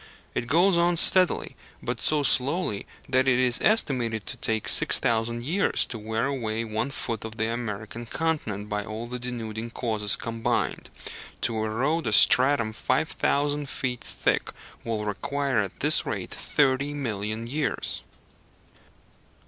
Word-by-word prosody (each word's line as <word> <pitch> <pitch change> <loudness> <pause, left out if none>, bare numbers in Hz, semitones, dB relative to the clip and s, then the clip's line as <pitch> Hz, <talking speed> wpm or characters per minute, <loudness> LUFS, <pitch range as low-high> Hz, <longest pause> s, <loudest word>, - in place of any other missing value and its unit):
It 120 - -3
goes 170 +6 +3
on 170 0 +2
steadily, 185 +2 +6 0.3
but - - -4
so 150 -1 +1
slowly 135 - +1 0.2
that 130 0 +1
it 125 -2 +4
is 125 -1 +2
estimated 125 - +1
to - - -6
take 110 -1 -1
6000 115 +1 +1
years 180 +10 +1
to 115 - -7
wear 110 +2 -2
away 115 -5 -2
one 110 +4 -3
foot 115 -4 -4
of 110 0 -8
the 110 0 0
American 115 0 -6
continent 115 -11 -3
by 105 -1 -3
all 110 +2 -6
the 125 +1 -6
denuding 115 -2 -5
causes 110 -3 0
combined. 115 0 -2 0.5
To 110 -2 0
erode 135 +8 -1
a 110 - 0
stratum 125 -2 +5
5000 145 +2 -1
feet 125 -3 -4
thick - - -1 0.3
will 110 -2 -3
require 135 +5 -1
at 100 -3 -4
this - - +6
rate - - -5
thirty 140 0 0
million 110 -4 -4
years. 140 +4 -3
120 Hz, 140 wpm, -26 LUFS, 110-140 Hz, 0.5 s, steadily